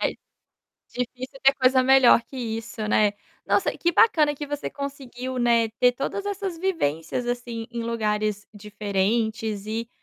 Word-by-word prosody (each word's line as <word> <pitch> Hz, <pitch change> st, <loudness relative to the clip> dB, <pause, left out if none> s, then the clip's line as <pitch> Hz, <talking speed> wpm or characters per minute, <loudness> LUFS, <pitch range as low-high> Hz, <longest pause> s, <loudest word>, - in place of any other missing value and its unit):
É -, -, +1 dB
d -, -, -18 dB, 0.8 s
difícil 255 Hz, +2 st, -5 dB
ter 270 Hz, +1 st, +7 dB
coisa 260 Hz, -1 st, +4 dB
melhor 265 Hz, -2 st, +6 dB
que 270 Hz, -, -14 dB
isso, 225 Hz, -2 st, -4 dB
né. 210 Hz, -1 st, +3 dB, 0.3 s
Nossa, -, -, +2 dB
que 345 Hz, -, +1 dB
bacana 310 Hz, -8 st, +4 dB
que 295 Hz, +1 st, -5 dB
você 290 Hz, 0 st, -4 dB
conseguiu, 260 Hz, -2 st, -6 dB
né, 235 Hz, -2 st, +3 dB
ter 250 Hz, -, +5 dB
todas 275 Hz, +10 st, -4 dB
essas 395 Hz, -3 st, -3 dB
vivências, 245 Hz, -, -1 dB
assim, 240 Hz, -1 st, -4 dB
em 235 Hz, -1 st, -4 dB
lugares 215 Hz, -2 st, -1 dB
diferentes 210 Hz, +1 st, -2 dB
e 225 Hz, +2 st, -4 dB
240 Hz, 150 wpm, -24 LUFS, 220-270 Hz, 0.8 s, ter